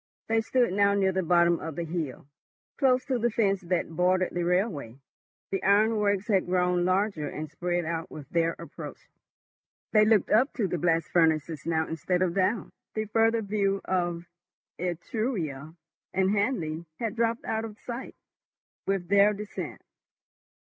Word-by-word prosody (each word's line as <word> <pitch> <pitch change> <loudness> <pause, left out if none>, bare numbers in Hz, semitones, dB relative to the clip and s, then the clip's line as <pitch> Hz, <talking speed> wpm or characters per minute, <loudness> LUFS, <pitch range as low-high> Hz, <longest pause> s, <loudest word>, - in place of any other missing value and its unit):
They 225 0 +2
stood 240 -2 +1
now 200 0 +3
near 195 -1 +2
the 190 0 0
bottom 170 -1 +3
of 160 -2 -6
the 170 - -2
hill, 160 -6 -4 0.5
close 255 -3 +3
to 260 -2 0
the 240 +1 +2
fence 200 -4 +1
that 175 -1 -1
bordered 185 +1 +2
the 175 - -1
railway. 175 - -1 0.5
The 195 -1 -1
ironworks 205 0 +3
had 195 -5 +2
grown 180 -1 +2
larger 185 -4 +1
and 155 0 -6
spread 175 0 -1
out 165 +2 -3
with 145 -3 -9
their 165 0 +1
approach. - - -8 0.9
They 215 -1 +6
looked 215 -3 +3
up 250 +6 +4
to 220 -7 0
the 175 -1 -2
blast 165 0 +2
furnaces 160 -2 +1
now 160 -1 +1
instead 180 +3 0
of 175 -2 0
down; 195 +4 0 0.2
the 215 0 -1
further 225 +1 +2
view 200 -1 0
of 175 -2 -1 0.5
Etruria 170 - -3 0.4
and 190 0 +3
Hanley 180 -7 -1
had 225 -2 -3
dropped 230 0 0
out 220 0 -1
of 215 -2 -7
sight 240 +2 -7 0.7
with 195 -3 0
their 200 +2 +5
descent. 210 0 -6
185 Hz, 155 wpm, -28 LUFS, 170-215 Hz, 0.9 s, They